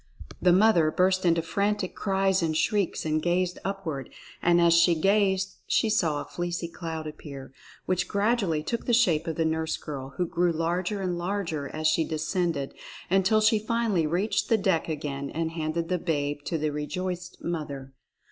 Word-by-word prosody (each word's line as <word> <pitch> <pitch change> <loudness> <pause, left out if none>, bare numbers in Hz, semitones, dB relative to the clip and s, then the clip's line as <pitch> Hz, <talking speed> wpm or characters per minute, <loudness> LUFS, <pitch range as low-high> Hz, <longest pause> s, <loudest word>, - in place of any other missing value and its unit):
The 180 - +5
mother 180 -4 +5
burst 185 +3 +2
into 165 -1 +3
frantic 200 +2 -1
cries 195 -1 +1
and 160 -2 0
shrieks 200 -2 0
and 155 0 +1
gazed 180 +1 0
upward; 170 -9 -4 0.3
and 175 0 +4
as 170 -1 +5
she 170 0 +5
gazed 195 +2 +2
she 220 - +2
saw 160 -8 +1
a - - -7
fleecy 175 -1 -3
cloud 165 -2 -6
appear, 140 -3 -9 0.3
which 180 -1 0
grad 215 +4 +1
ually 160 -7 -1
took 235 - -3
the 240 - +4
shape 170 -9 +3
of 160 - -2
the 165 - 0
nurse 160 0 -1
girl, 135 -3 -7
who 180 - +1
grew 175 +1 +1
larger 175 +5 -1
and 180 -2 -1
larger 170 -6 -2
as 155 0 -5
she 155 +1 +3
descended, 155 -2 -2 0.4
until 195 +3 +4
she 215 0 +4
finally 215 -6 0
reached 185 +11 0
the 225 - +4
deck 190 -5 +1
again 140 -2 -4
and 165 0 -2
handed 165 +1 -2
the 180 0 0
babe 145 -4 -1
to 165 - -1
the 155 -1 -1
rejoiced 175 +4 -4
mother. 140 -5 -4
170 Hz, 175 wpm, -27 LUFS, 155-190 Hz, 0.4 s, The